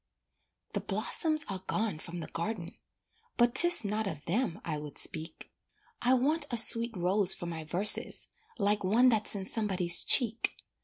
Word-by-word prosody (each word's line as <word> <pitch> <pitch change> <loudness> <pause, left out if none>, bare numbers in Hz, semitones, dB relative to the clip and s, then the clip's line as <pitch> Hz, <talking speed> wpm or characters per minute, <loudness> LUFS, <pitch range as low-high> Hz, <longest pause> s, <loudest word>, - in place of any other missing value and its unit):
The - - -3
blossoms 310 -3 0
are 195 -2 -6
gone 210 -7 -3
from 170 +2 -9
the - - -8
garden, 170 0 -7 0.6
But 240 0 +1
'tis 345 -5 +6
not 210 +1 -4
of 155 -5 -9
them 205 -1 -3
I 155 -3 -5
would 150 -2 -10
speak; 160 0 -3 0.5
I 250 +1 +2
want 290 +4 0
a 240 - -3
sweet 230 -1 +5
rose 185 +2 +2
for 175 - -9
my 165 -2 -7
verses 185 +7 +1 0.3
Like 205 -1 -1
one 230 +7 +2
that's 215 -3 +1
in 195 -1 -6
somebody's 190 -6 +1
cheek. 230 -3 +2
205 Hz, 160 wpm, -28 LUFS, 175-235 Hz, 0.6 s, tis